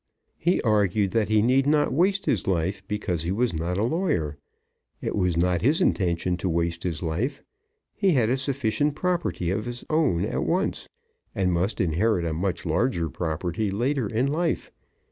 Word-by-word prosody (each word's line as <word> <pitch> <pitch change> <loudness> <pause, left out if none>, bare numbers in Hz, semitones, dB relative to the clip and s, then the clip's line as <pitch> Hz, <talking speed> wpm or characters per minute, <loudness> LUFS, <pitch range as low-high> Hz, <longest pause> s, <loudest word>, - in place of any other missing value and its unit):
He 175 +3 +2
argued 105 -3 +2
that 110 -3 +1
he 110 -1 +4
need 130 +3 +3
not 150 0 +3
waste 190 +6 +2
his 105 - 0
life 95 +2 0
because 95 -5 -2
he 85 +2 -2
was 115 +3 +1
not 85 +3 -2
a 105 - +1
lawyer. 135 - 0 0.6
It - - -3
was 90 -4 +1
not 90 0 +2
his 145 +8 +3
intention 90 - +1
to 90 +1 -2
waste 85 0 -1
his 85 -2 -3
life. 90 - -2 0.5
He 195 -4 +2
had 120 -6 +3
a 125 - +2
sufficient 140 +1 0
property 170 - -1
of 105 +4 -2
his 120 0 -6
own 150 - +2
at - - -2
once, - - -1 0.5
and 90 -2 +1
must 90 +5 0
inherit 90 +2 +1
a 80 - -1
much 90 +3 -2
larger 85 -3 0
property 85 +6 -2
later 120 +4 0
in 115 +4 +1
life. 160 +4 -1
105 Hz, 175 wpm, -25 LUFS, 85-135 Hz, 0.6 s, he